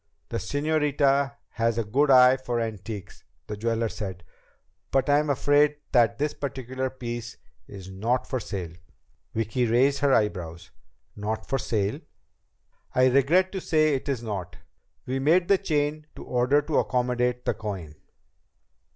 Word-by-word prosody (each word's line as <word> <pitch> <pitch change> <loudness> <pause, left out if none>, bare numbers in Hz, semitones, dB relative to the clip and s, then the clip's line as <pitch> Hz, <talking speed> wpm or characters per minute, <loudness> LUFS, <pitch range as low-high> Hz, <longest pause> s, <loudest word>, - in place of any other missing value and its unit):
"The - - -2
señorita 145 -2 +1
has 115 -1 0
a 115 - +1
good 135 +8 +1
eye 130 -1 +7
for 125 -2 -3
antiques," 105 -2 -6 0.2
the 105 - -5
jeweler 115 +2 -1
said. 95 -4 -6 0.7
"But 135 +1 +1
I 145 - +5
am 150 0 -1
afraid 145 +2 +3 0.2
that 120 -5 +3
this 150 +1 -1
particular 130 -1 -4
piece 120 -3 -6 0.3
is 95 -2 -10
not 115 +7 -1
for 130 - -2
sale." 90 -6 -5 0.6
Vicki 115 +3 0
raised 135 +5 +3
her 140 -1 +2
eyebrows. 90 -8 -1 0.4
"Not 105 +1 -4
for 135 - 0
sale?" 105 -3 -1 1.0
"I 130 0 +5
regret 155 +9 +3
to 190 - -4
say 155 -2 +2
it 135 +1 -3
is 125 -4 -2
not. 95 -6 -5 0.5
We 130 +1 -2
made 170 +6 +3
the 200 -1 +5
chain 150 -4 -1
to - - -9
order 125 +4 +2
to 155 0 +1
accommodate 125 -1 0
the - - +1
coin." 95 -8 -6
125 Hz, 150 wpm, -26 LUFS, 110-145 Hz, 1.0 s, eye